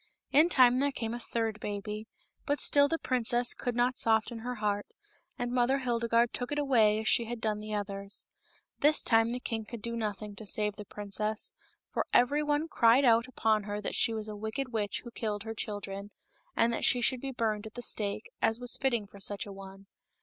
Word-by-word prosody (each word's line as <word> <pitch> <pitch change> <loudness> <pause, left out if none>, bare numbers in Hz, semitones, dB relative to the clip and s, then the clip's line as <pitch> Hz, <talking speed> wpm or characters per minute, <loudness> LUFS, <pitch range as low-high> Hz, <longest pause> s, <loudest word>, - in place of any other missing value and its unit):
In 310 +5 +6
time 255 -5 +5
there 285 +1 +2
came 225 -4 -4
a 240 - -4
third 225 -2 -2
baby, 210 +1 -5 0.4
but 290 0 +1
still 285 0 +4
the 330 - 0
princess 245 -3 +2
could 245 -2 -3
not 245 +1 +2
soften 225 +1 +1
her 250 +2 -4
heart, 205 -2 -1 0.5
and 245 0 -2
Mother 250 +2 +2
Hildegarde 235 -2 +1
took 245 +2 -3
it 290 - -1
away 230 -7 +3
as 220 - -5
she 235 0 +3
had 240 +1 -5
done 215 -2 -1
the 215 0 -4
others. 200 0 -3 0.5
This 300 +1 +4
time 225 0 +4
the 245 +1 -2
king 225 -3 -3
could 225 0 -9
do 235 0 -3
nothing, 210 -2 -4
to 220 - -9
save 210 0 0
the 210 - -8
princess, 210 +2 -2 0.4
for - - -1
every 280 +5 +4
one 295 +1 0
cried 240 -1 +4
out 230 0 +4
upon 220 -4 +1
her 205 0 -3
that 210 - -3
she 230 - +2
was 220 -1 -4
a 210 - -6
wicked 220 +6 -3
witch 205 -3 -1
who 240 - -9
killed 210 -3 -3
her 225 0 -5
children, 205 -2 -5 0.5
and 230 +1 +3
that - - -3
she 250 - +4
should 245 +1 +2
be 275 - -4
burned 220 -3 -1
at 220 - -13
the 245 - -5
stake, 210 -2 -3
as 225 +1 +2
was 245 0 -2
fitting 240 -6 +1
for 200 0 -14
such 200 0 -3
a 200 - -8
one. 195 0 -11
225 Hz, 215 wpm, -30 LUFS, 210-245 Hz, 0.5 s, In